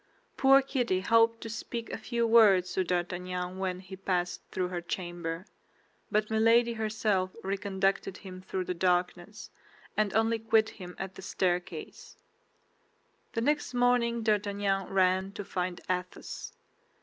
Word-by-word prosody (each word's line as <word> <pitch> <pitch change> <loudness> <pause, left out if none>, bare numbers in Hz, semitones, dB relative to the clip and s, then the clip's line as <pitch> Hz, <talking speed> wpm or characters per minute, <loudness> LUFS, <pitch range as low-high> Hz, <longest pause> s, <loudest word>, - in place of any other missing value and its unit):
Poor 270 0 +6
Kitty 245 -9 0
hoped 230 +2 +3
to - - -6
speak 230 +1 -5
a - - -3
few 235 -1 -1
words 210 -6 +5
to 190 - +1
D'Artagnan 180 +1 -3
when 185 -1 -2
he 190 0 -9
passed 180 -2 -1
through 180 -1 -2
her 175 -1 -3
chamber; 175 0 -4 0.7
but 215 +1 +1
Milady 230 +2 +4
herself 215 -4 0
reconducted 195 -1 -1
him 185 -2 -10
through 185 0 -3
the 180 - -2
darkness, 180 +3 -1 0.4
and 210 -2 +1
only 225 +1 +2
quit 220 0 +3
him 180 -3 -10
at 190 0 -5
the - - -10
staircase. 180 -2 -3 1.2
The 230 - -1
next 295 0 0
morning 245 -1 +2
D'Artagnan 200 -2 0
ran 190 0 +2
to 205 - -6
find 180 -2 -3
Athos. 180 0 -4
195 Hz, 135 wpm, -30 LUFS, 185-225 Hz, 1.2 s, Poor